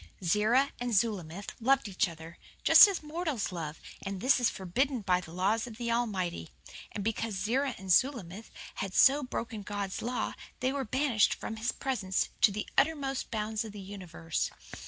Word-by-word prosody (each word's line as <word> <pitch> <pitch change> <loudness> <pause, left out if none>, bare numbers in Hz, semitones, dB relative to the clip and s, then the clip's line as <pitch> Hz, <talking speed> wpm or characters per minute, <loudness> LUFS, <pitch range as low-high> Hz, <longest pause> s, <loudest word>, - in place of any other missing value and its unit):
"Zerah 215 +10 +3
and 245 -2 -1
Zulamith 200 -4 -1
loved 270 +1 +3
each 190 -1 0
other, 165 0 -11 0.2
just - - +10
as 390 -5 -3
mortals 305 - -2
love, 160 -3 -5 0.2
and 195 -1 -4
this 260 +5 +4
is 245 - +3
forbidden 245 +8 -1
by 180 -2 +2
the 160 - -11
laws 200 +7 0
of 220 -2 -10
the 235 -1 -2
Almighty. 190 - -1 0.4
And 205 - -4
because 225 0 -2
Zerah 245 +7 0
and 190 -1 -4
Zulamith 220 -3 +1 0.3
had 195 -1 -4
so 280 +2 +6
broken 230 -4 -4
God's 200 -1 -4
law 245 +2 -2 0.3
they 255 +2 0
were 275 -2 -2
banished 255 -2 +2
from 220 - -6
His 225 +3 0
presence 215 -9 -1
to 210 - +6
the 210 +2 -3
uttermost 275 -3 0
bounds 215 0 -2
of 220 -2 -8
the 205 - -8
universe. 185 -5 -4
220 Hz, 175 wpm, -30 LUFS, 190-255 Hz, 0.4 s, just